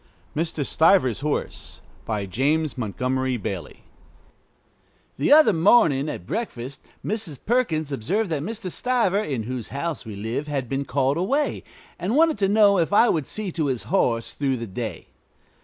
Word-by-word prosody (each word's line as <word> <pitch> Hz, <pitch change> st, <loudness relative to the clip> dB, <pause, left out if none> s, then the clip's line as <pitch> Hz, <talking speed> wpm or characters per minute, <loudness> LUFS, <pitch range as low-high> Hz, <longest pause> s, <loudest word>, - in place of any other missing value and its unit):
MR. 160 Hz, -2 st, -1 dB
STIVER'S 160 Hz, -, +3 dB
HORSE 150 Hz, +1 st, -3 dB, 0.3 s
BY 105 Hz, -3 st, -2 dB
JAMES 145 Hz, -, 0 dB
MONTGOMERY 130 Hz, +2 st, -1 dB
BAILEY 95 Hz, -4 st, -6 dB, 1.3 s
The 140 Hz, -, +1 dB
other 295 Hz, -8 st, +7 dB
morning 160 Hz, -, +4 dB
at 85 Hz, -, -6 dB
breakfast 135 Hz, -, -5 dB, 0.2 s
Mrs. 205 Hz, -9 st, -3 dB
Perkins 170 Hz, -, +1 dB
observed 175 Hz, -, -1 dB
that 150 Hz, -3 st, -1 dB
Mr. 210 Hz, +1 st, -5 dB
Stiver, 230 Hz, -5 st, +1 dB
in 130 Hz, -, -3 dB
whose 125 Hz, 0 st, -5 dB
house 150 Hz, +2 st, -4 dB
we 110 Hz, -3 st, -8 dB
live, 115 Hz, +8 st, -3 dB
had 140 Hz, -4 st, -2 dB
been 135 Hz, +3 st, -2 dB
called 135 Hz, +2 st, +1 dB
away, 275 Hz, -, 0 dB, 0.4 s
and 190 Hz, +7 st, -1 dB
wanted 320 Hz, -6 st, +4 dB
to 195 Hz, -1 st, +2 dB
know 205 Hz, -2 st, +5 dB
if 165 Hz, -, +1 dB
I 230 Hz, +4 st, +5 dB
would 155 Hz, -5 st, 0 dB
see 210 Hz, -3 st, -4 dB
to 160 Hz, -3 st, -1 dB
his 130 Hz, -4 st, -2 dB
horse 115 Hz, -11 st, +1 dB
through 135 Hz, -3 st, -1 dB
the 115 Hz, -, -5 dB
day. 110 Hz, +2 st, -5 dB
150 Hz, 155 wpm, -24 LUFS, 130-200 Hz, 1.3 s, other